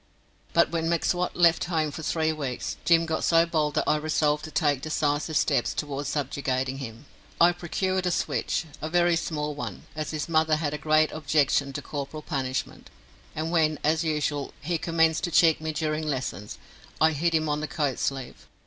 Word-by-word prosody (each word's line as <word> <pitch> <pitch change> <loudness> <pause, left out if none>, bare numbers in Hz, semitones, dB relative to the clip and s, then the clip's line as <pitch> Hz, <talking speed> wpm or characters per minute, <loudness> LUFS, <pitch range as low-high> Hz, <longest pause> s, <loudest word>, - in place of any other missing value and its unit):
But - - +4
when 165 -1 -1
M'Swat 175 +1 0
left 170 -1 +4
home 160 -3 0
for 145 - -7
three 160 0 0
weeks 140 -5 -4
Jim 165 -1 +5
got 160 -1 -2
so 165 0 +4
bold 155 -3 0
that - - +2
I 150 - +3
resolved 150 -1 +1
to - - -7
take 145 -3 +1
decisive 150 0 0
steps - - +1
towards 145 -1 -3
subjugating 135 -2 -2
him. 115 0 -8 0.3
I 170 +1 +7
procured 185 +2 -1
a - - +3
switch 170 - -1 0.2
a 155 - -3
very 175 0 +3
small 150 -3 -2
one, 145 - -6
as 155 -1 -3
his 150 -3 -3
mother 160 -1 +3
had 155 -1 -2
a 150 - -4
great 155 +1 +3
objection 145 -2 +1
to 145 - -5
corporal 145 +2 -5
punishment 130 -4 -3 0.5
and 160 +2 -2
when, 155 -3 +2
as 155 +2 +2
usual, 150 -3 -1
he 165 +2 -2
commenced 165 0 +2
to - - -3
cheek 160 -1 +4
me 160 0 -2
during 155 0 -2
lessons, 130 -7 -4 0.4
I 160 0 +5
hit 165 +2 0
him 155 0 +1
on 150 0 -1
the 155 - -3
coat 140 -1 -1
sleeve. 135 -2 -4
155 Hz, 185 wpm, -26 LUFS, 145-165 Hz, 0.5 s, I